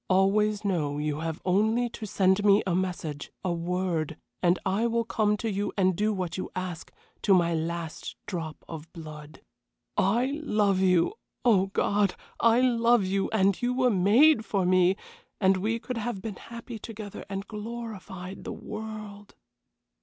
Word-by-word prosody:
Always 205 +2 +3
know 155 -7 0
you 150 0 -2
have 160 0 -3
only 220 +6 +2
to 220 -1 -7
send 190 +1 +2
me 205 0 +5
a 185 - 0
message, 175 -5 -3
a 180 -2 0
word, 170 -2 -1 0.2
and 175 0 +4
I 200 +5 +1
will 230 0 +1
come 210 -2 +1
to 225 - -3
you 200 +1 -1
and 185 -2 +3
do 210 +4 +1
what 185 -4 -3
you 185 - -4
ask, 185 -3 -5 0.3
to 195 - +5
my 170 -2 +3
last 165 0 -4
drop 165 -5 -5
of 160 0 -8
blood. 155 -3 -10 0.5
I 245 +9 +1
love 210 -9 +2
you! 185 - +3 0.3
Oh, 195 -5 +5
God! 200 0 +1 0.2
I 230 +1 +5
love 235 -3 +4
you, 195 +1 0
and 195 -3 +2
you 245 +1 0
were 255 -1 +3
made 225 +8 +5
for 195 -4 0
me, 185 +1 +4 0.4
and 190 -1 +4
we 220 +5 0
could 250 +1 -5
have 225 -2 -3
been 205 0 -6
happy 235 0 -8
together 210 -2 -8
and 195 0 -4
glorified 210 -4 -7
the - - -5
world." 215 -1 -8
195 Hz, 160 wpm, -28 LUFS, 180-220 Hz, 0.5 s, me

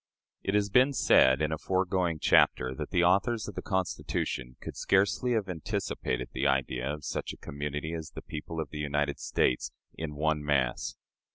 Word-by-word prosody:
It 95 - -1
has 105 -1 +1
been 130 +5 +5
said, 65 - +5
in 75 - 0
a 80 - -2
foregoing 95 -3 0
chapter, 65 -3 +3
that - - -5
the 90 - +2
authors 100 +6 +2
of - - -6
the - - -5
Constitution 75 -9 -2
could - - -7
scarcely 100 +6 +2
have 110 -4 0
anticipated 75 -7 -3
the 70 - +1
idea 65 0 0
of 75 -1 -6
such - - -3
a - - -12
community 75 +2 -4
as 80 -2 -5
the - - -9
people 80 +2 -6
of 80 -3 -4
the 75 - -6
United 75 -1 -1
States 60 - 0 0.2
in 80 -2 -5
one 75 0 0
mass. 70 -4 0
80 Hz, 180 wpm, -29 LUFS, 70-95 Hz, 0.2 s, been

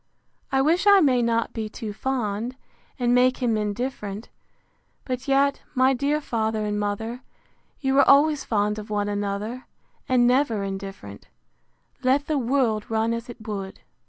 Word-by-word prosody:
—I 270 0 +3
wish 340 +7 +2
I 400 -1 +8
may 260 -7 +3
not 230 -1 0
be 220 -2 -4
too 215 -1 -6
fond, 235 -1 -2 0.4
and 245 -2 +1
make 255 +1 +4
him 240 -4 0
indifferent: 210 -1 -4 0.8
But 255 0 -4
yet, 280 +1 +2
my 260 +1 +4
dear 285 +4 0
father 220 -5 -2
and 210 0 -1
mother, 220 +4 -3 0.6
you 265 -2 +1
were 275 - +5
always 290 0 +5
fond 210 -1 0
of 210 +1 -9
one 205 -1 -1
another, 205 +4 -3 0.4
and 250 -1 +4
never 245 -4 +2
indifferent, 195 - -7 0.7
let 270 +3 +2
the 300 -2 0
world 235 -4 0
run 225 +1 +1
as 230 +1 -5
it 235 -2 -11
would. 195 -2 -5
235 Hz, 155 wpm, -24 LUFS, 210-265 Hz, 0.8 s, I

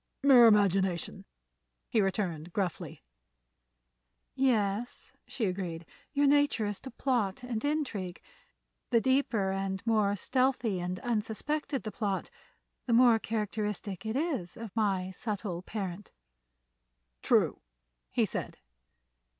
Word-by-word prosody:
"Mere 255 -4 +8
imagination," 195 -4 +2 0.6
he 220 - +2
returned, 180 -4 -2
gruffly. 185 - -3 1.3
"Yes," 235 -4 0
she 235 - -2
agreed; 180 -3 -3 0.3
"your 285 -1 +2
nature 285 -5 +3
is 205 -1 -3
to 265 - -8
plot 240 -5 -1
and 240 -3 -3
intrigue. 255 - -2 0.7
The 235 - +4
deeper, 230 -6 +1
the 195 0 -2
more 215 -3 +2
stealthy 250 -3 0
and 180 +1 -3
unsuspected 245 +6 -2
the 215 - -4
plot, 200 -2 -2 0.6
the 240 - +2
more 235 -1 +6
characteristic 210 -3 -3
is 245 - -2
it - - -11
of 220 -3 -9
my 195 -4 0
subtle 195 -3 -4
parent." 190 -1 -5 1.1
"True," - - +2 0.5
he - - +2
said. - - -5
215 Hz, 110 wpm, -30 LUFS, 190-245 Hz, 1.3 s, Mere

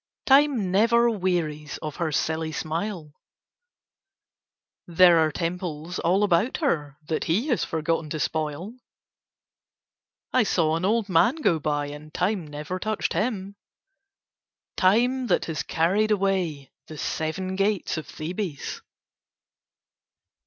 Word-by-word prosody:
Time 270 -8 +4
never 235 +4 +4
wearies 170 -7 -2
of 150 -2 -5
her 165 -2 -1
silly 160 +1 -1
smile. 160 0 -4 1.7
There 175 0 +6
are 160 -1 +2
temples 170 0 -4
all 185 +5 +2
about 205 +5 +2
her 150 - -1
that 160 - -1
he 215 - 0
has 245 - +1
forgotten 160 0 -1
to 155 - -3
spoil. 155 - -2 1.6
I 255 - +5
saw 165 -7 +2
an 165 +3 -1
old 220 +1 +1
man 195 - +3
go 185 - +1
by, 145 -1 -1
and 150 +1 -10
Time 180 -1 -1
never 150 +5 -5
touched 215 +2 -2
him. 200 -3 -2 1.2
Time 245 +7 +2
that 185 - +2
has 160 -2 -3
carried 190 +7 +1
away 185 -9 0 0.2
the 155 - -9
seven 185 +6 -3
gates 200 0 0
of 155 - -5
Thebes! 170 -1 -5
175 Hz, 120 wpm, -25 LUFS, 155-210 Hz, 1.7 s, There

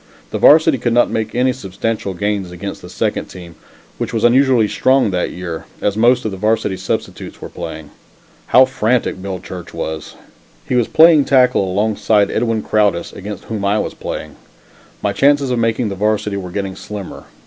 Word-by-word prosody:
The - - -3
varsity 155 -2 +6
could 120 0 0
not 120 +1 +3
make 110 +1 -3
any 125 +1 +2
substantial 105 -3 -4
gains 100 0 -2
against 95 +3 -7
the - - -11
second - - -2
team, 85 -2 -11 0.5
which - - -3
was 110 - -1
unusually 125 -2 +4
strong 130 -1 +2
that 90 -1 -1
year, 85 -2 -6
as 100 - 0
most 120 +3 +3
of 110 - -1
the 95 - -6
varsity 110 -1 0
substitutes - - -5
were - - -8
playing. 80 -2 -8 0.6
How 130 +1 +6
frantic 125 -6 -1
Bill 95 -1 -5
Church 90 -1 -9
was! 80 -1 -5 0.5
He - - -2
was 120 -2 +2
playing 160 -3 +6
tackle 125 -8 +3
alongside 105 +1 +1
of - - -5
Edwin 115 -1 0
Crowdis, 105 -5 +1
against 100 +1 -7
whom 110 -3 -5
I 100 +2 +2
was - - -2
playing. - - -7 0.7
My 100 -1 0
chances 140 0 +3
of 125 - 0
making 115 0 0
the 100 - -4
Varsity 105 0 0
were 90 -2 -6
getting 95 +1 -4
slimmer. 105 -3 -8
105 Hz, 180 wpm, -17 LUFS, 95-125 Hz, 0.7 s, varsity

